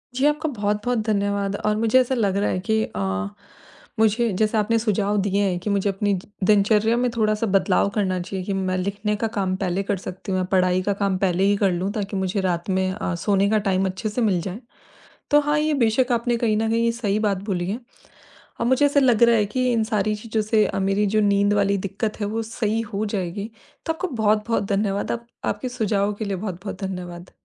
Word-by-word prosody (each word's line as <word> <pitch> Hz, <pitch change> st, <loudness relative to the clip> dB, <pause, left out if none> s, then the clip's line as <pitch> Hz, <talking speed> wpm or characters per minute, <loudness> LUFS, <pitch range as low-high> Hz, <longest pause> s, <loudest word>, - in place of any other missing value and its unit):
जी, 260 Hz, +3 st, +1 dB
आपका 300 Hz, +2 st, +1 dB
बहुत-बहुत 210 Hz, 0 st, -1 dB
धन्यवाद। 200 Hz, -2 st, 0 dB
और 210 Hz, 0 st, +2 dB
मुझे 230 Hz, +3 st, +4 dB
ऐसा 255 Hz, +1 st, +1 dB
लग 200 Hz, -5 st, +1 dB
रहा 200 Hz, -, +1 dB
है 185 Hz, -, -1 dB
कि 220 Hz, 0 st, +3 dB
अ, -, -, -3 dB, 1.0 s
मुझे 220 Hz, +1 st, +3 dB
जैसे 215 Hz, +1 st, +2 dB
आपने 220 Hz, +2 st, +2 dB
सुझाव 210 Hz, -2 st, 0 dB
दिए 200 Hz, +1 st, 0 dB
हैं 185 Hz, -3 st, 0 dB
कि 185 Hz, -, -4 dB
मुझे 200 Hz, 0 st, +1 dB
अपनी 200 Hz, +1 st, 0 dB
ज 185 Hz, -1 st, -5 dB, 0.2 s
दिनचर्या 210 Hz, +3 st, +3 dB
में 250 Hz, 0 st, +1 dB
थोड़ा-सा 215 Hz, 0 st, +1 dB
बदलाव 195 Hz, 0 st, +2 dB
करना 190 Hz, -3 st, 0 dB
चाहिए, 185 Hz, +1 st, -5 dB
कि 200 Hz, -, -2 dB
मैं 185 Hz, -1 st, -1 dB
लिखने 200 Hz, +3 st, -1 dB
का 225 Hz, +2 st, -1 dB
काम 190 Hz, -2 st, 0 dB
पहले 190 Hz, 0 st, -1 dB
कर 200 Hz, 0 st, -1 dB
सकती 185 Hz, +1 st, -7 dB
हूँ 185 Hz, -, +1 dB
या -, -, 0 dB
पढ़ाई 185 Hz, -1 st, +3 dB
का 200 Hz, -, +1 dB
काम 200 Hz, -1 st, 0 dB
पहले 185 Hz, -1 st, +1 dB
ही 200 Hz, +1 st, +4 dB
कर 195 Hz, -2 st, +2 dB
लूँ 180 Hz, +3 st, -1 dB
ताकि 205 Hz, -2 st, -3 dB
मुझे 190 Hz, +1 st, -1 dB
रात 175 Hz, -1 st, -1 dB
में 190 Hz, 0 st, +1 dB
अ, 190 Hz, -2 st, -3 dB
सोने 200 Hz, +3 st, +1 dB
का 215 Hz, -, +3 dB
टाइम 190 Hz, 0 st, +1 dB
अच्छे 190 Hz, +4 st, -3 dB
से 215 Hz, +4 st, -2 dB
मिल 195 Hz, -6 st, +2 dB
जाए, 190 Hz, +4 st, -5 dB, 0.7 s
तो 295 Hz, 0 st, +6 dB
हाँ, 295 Hz, 0 st, +1 dB
ये 305 Hz, 0 st, +1 dB
बेशक 245 Hz, 0 st, +2 dB
आपने 235 Hz, 0 st, +1 dB
कहीं 230 Hz, -2 st, +1 dB
न 220 Hz, +1 st, 0 dB
कहीं 230 Hz, +1 st, +2 dB
ये 230 Hz, -, +2 dB
सही 215 Hz, -3 st, -1 dB
बात 200 Hz, -2 st, 0 dB
बोली 180 Hz, -4 st, -2 dB
है। 225 Hz, +5 st, -3 dB, 0.8 s
अ, -, -, +1 dB
मुझे 260 Hz, +4 st, +3 dB
ऐसा 285 Hz, 0 st, +3 dB
लग 245 Hz, -4 st, +3 dB
रहा 235 Hz, 0 st, +6 dB
है 210 Hz, -, +3 dB
कि 255 Hz, -1 st, +2 dB
इन 225 Hz, -2 st, +1 dB
सारी 215 Hz, -1 st, 0 dB
चीज़ों 220 Hz, 0 st, -2 dB
से 215 Hz, 0 st, +3 dB
अ, -, -, -3 dB
मेरी 195 Hz, +2 st, +1 dB
जो -, -, +5 dB
नींद 200 Hz, 0 st, +3 dB
वाली 200 Hz, -1 st, +2 dB
दिक्कत 210 Hz, +3 st, -4 dB
है, 205 Hz, -, 0 dB
वो 220 Hz, +2 st, -2 dB
सही 225 Hz, 0 st, -2 dB
हो 205 Hz, +2 st, 0 dB
जाएगी, 200 Hz, +1 st, -3 dB, 0.4 s
तो 325 Hz, -, +1 dB
आपका 355 Hz, +3 st, -4 dB
बहुत-बहुत 215 Hz, 0 st, +2 dB
धन्यवाद, 200 Hz, 0 st, 0 dB
आप 235 Hz, 0 st, -5 dB, 0.2 s
आपके 255 Hz, -, -2 dB
सुझावों 210 Hz, -4 st, 0 dB
के 215 Hz, -, -5 dB
लिए 200 Hz, -2 st, -2 dB
बहुत-बहुत 190 Hz, 0 st, -6 dB
धन्यवाद। 180 Hz, -2 st, -6 dB
205 Hz, 225 wpm, -23 LUFS, 195-225 Hz, 1.0 s, तो